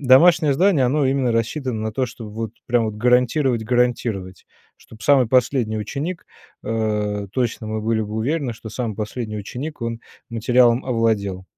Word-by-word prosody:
домашнее 145 +3 +5
здание- 175 -5 +3
оно 140 +2 +1
именно 130 -2 +1
рассчитано 115 +1 -1
на 110 0 -3
то 130 +3 0
чтоб 110 -1 -9
вот 110 0 -4
прям 120 -1 +2
вот 110 - -4
гарантировать 125 +2 +2
гарантировать, 115 -6 -1 0.3
чтоб 110 0 -16
самый 130 -2 +4
последний 125 -3 +2
ученик, 145 - -4 0.4
э, 105 -2 -1
точно 120 -3 -2
мы 110 0 -3
были 110 +1 0
бы 105 0 -6
уверены, 130 +4 -1
что 110 - -10
самый 115 -1 -3
последний, 110 0 -4
ученик- 125 +8 -6
он 115 0 -3 0.3
материалом 120 +1 +3
овладел. 110 -6 0
115 Hz, 155 wpm, -21 LUFS, 110-130 Hz, 0.4 s, домашнее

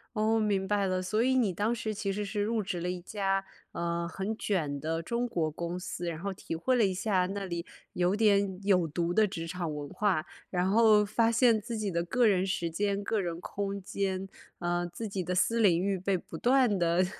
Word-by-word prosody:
哦， 220 +1 +2
明 200 -3 +1
白 200 -1 +1
了， 185 0 0
所 215 +5 0
以 260 +1 +2
你 225 -7 +2
当 210 +6 0
时 225 -2 -3
其 200 -1 -2
实 205 +1 -2
是 205 +1 -2
入 220 +2 0
职 185 -3 -3
了 180 - -2
一 180 0 -3
家， 195 0 -1 0.3
呃， 170 0 -2
很 195 +5 -4
卷 160 -11 -1
的 165 +1 -1
中 235 +8 -1
国 170 -10 -1
公 170 +3 -4
司， 180 -1 -5
然 160 -1 -5
后 200 +3 -3
体 180 - -7
会 170 +11 +1
了 235 -4 +4
一 190 - 0
下 185 -1 +1
那 195 +1 -4
里 170 -2 -4 0.3
有 180 +1 +2
点 200 -3 +2
有 185 -4 +4
毒 170 +2 -1
的 220 +3 +5
职 165 -4 -5
场 170 -2 -3
文 145 -1 -5
化。 185 -3 0 0.2
然 180 0 0
后 215 0 +5
发 225 +2 +2
现 230 -1 +4
自 230 +2 -5
己 215 -2 -1
的 170 -2 0
个 240 +7 +2
人 190 -3 +3
时 175 -3 -1
间、 200 +4 -1
个 210 +1 0
人 170 -2 -3
空 200 +2 -4
间， 190 0 -2 0.3
呃， 175 0 0
自 175 +6 -6
己 195 -2 -3
的 180 +2 -2
私 230 +5 +2
领 180 -6 +5
域 195 0 0
被 190 +1 0
不 170 - -9
断 245 -1 +3
地 175 +1 +2
195 Hz, 240 characters per minute, -30 LUFS, 175-210 Hz, 0.3 s, 的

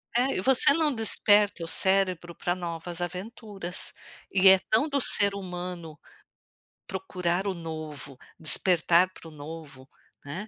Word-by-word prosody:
É, 255 +3 0
e 185 - -3
você 265 +4 +3
não 310 -2 -1
desperta 205 -5 +2
o - - -7
cérebro 185 -2 +2
pra 175 0 -3
novas 170 0 -7
aventuras. 190 0 -4 0.4
E 190 0 +3
é 190 0 +7
tão 225 +8 +1
do 280 0 -1
ser 200 -4 +5
humano 180 -4 -9 0.9
procurar 180 -1 -4
o 195 - -2
novo, 155 -5 -9 0.2
despertar 175 +2 +3
para 165 - -15
o - - -17
novo, 145 -3 -12 0.4
né, 185 +10 -8
180 Hz, 140 wpm, -25 LUFS, 165-200 Hz, 0.9 s, é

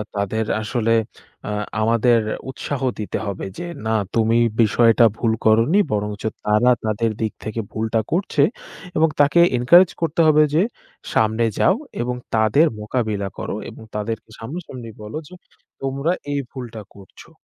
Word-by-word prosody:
তাদের 105 +2 -1 0.2
আসলে 115 +1 -1 0.6
আ - - -3 0.3
আমাদের 115 +1 +3 0.3
উৎসাহ 135 0 -4 0.2
দিতে 105 - -3
হবে 100 -2 -4
যে, - - -5 0.2
না 110 - 0 0.2
তুমি 115 +1 +3 0.2
বিষয়টা 115 +1 +5
ভুল 115 -2 +1
করোনি 115 - +4
বরংচ 105 0 -2 0.2
তারা 105 +4 +4 0.2
তাদের 110 +1 0
দিক 110 -1 0
থেকে 110 +1 -4
ভুলটা 110 +1 -1
করছে 185 +4 +1 0.5
এবং 160 0 +4
তাকে 145 +4 +4 0.2
encourage 170 +9 +6
করতে 165 0 -1
হবে 155 0 +6
যে, 160 - +4 0.5
সামনে 110 +1 +2 0.2
যাও 190 - +4 0.3
এবং 125 +1 -2 0.2
তাদের 110 +9 +4
মোকাবিলা 105 -2 -2
করো - - -4
এবং - - -12
তাদেরকে 110 +1 -4
সামনাসামনি 130 -1 -7
বলো 105 +8 -6
যে, - - -15 0.5
তোমরা 135 +4 -1 0.2
এই 145 - 0
ভুলটা 120 -4 -7
করছো। 100 -1 -15
115 Hz, 140 wpm, -21 LUFS, 110-135 Hz, 0.6 s, encourage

